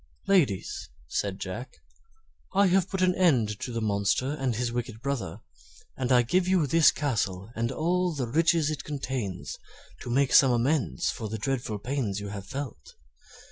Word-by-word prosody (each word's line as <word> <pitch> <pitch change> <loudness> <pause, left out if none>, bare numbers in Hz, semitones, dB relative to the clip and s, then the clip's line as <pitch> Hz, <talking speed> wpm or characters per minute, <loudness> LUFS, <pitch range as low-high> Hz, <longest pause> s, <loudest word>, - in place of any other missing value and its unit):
"Ladies," 150 - +1 0.2
said 100 +7 -2
Jack, 95 +8 -6 0.8
"I 200 +1 +5
have 185 0 +3
put 190 -1 -1
an 180 0 +4
end 125 - +2
to 125 - -4
the 115 -1 -2
monster 105 +6 +1
and 135 -5 -1
his 120 +1 -1
wicked 120 -2 -4
brother, 130 -10 -3 0.5
and 130 -1 -2
I 125 -1 +6
give 180 +9 +1
you 185 -4 +3
this 160 +2 +5
castle 105 -8 -2
and 115 +2 -1
all 175 +5 +1
the 135 -3 -1
riches 160 +4 +2
it 155 - -4
contains 130 -9 -4 0.4
to - - -7
make 135 +2 +2
some 135 -2 +7
amends 125 - +1
for 110 - -6
the 110 - -3
dreadful 120 -2 -2
pains 115 -3 -2
you 100 0 -6
have 100 -1 -7
felt." 135 - -7
130 Hz, 170 wpm, -27 LUFS, 110-155 Hz, 0.8 s, some